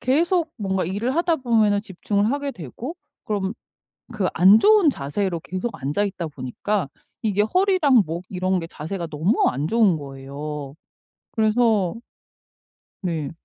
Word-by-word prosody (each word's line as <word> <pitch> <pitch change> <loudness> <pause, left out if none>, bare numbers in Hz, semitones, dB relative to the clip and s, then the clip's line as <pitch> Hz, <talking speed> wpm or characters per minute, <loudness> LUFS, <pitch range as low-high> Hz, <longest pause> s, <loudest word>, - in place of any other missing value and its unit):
계속 330 +5 +2
뭔가 190 -4 -1
일을 210 - -2
하다 335 0 +2
보면은 220 -6 +2
집중을 200 0 -1
하게 285 0 -1
되고 235 - -7 0.3
그럼 200 -2 -1 0.6
그 205 -4 -1
안 190 +6 +7
좋은 415 -7 +6
자세로 170 - -2
계속 185 +7 -4
앉아 150 +10 0
있다 185 -4 -3
보니까 145 +6 -3 0.3
이게 205 -3 +1
허리랑 360 - +4
목 170 +3 -5
이런 185 0 0
게 165 - -5
자세가 170 +2 -5
너무 160 +8 +1
안 140 +4 -2
좋은 215 -6 +4
거예요. 140 +1 -7 0.6
그래서 220 -4 +2 1.1
네. 160 -6 -2
200 Hz, 270 characters per minute, -23 LUFS, 165-235 Hz, 1.1 s, 안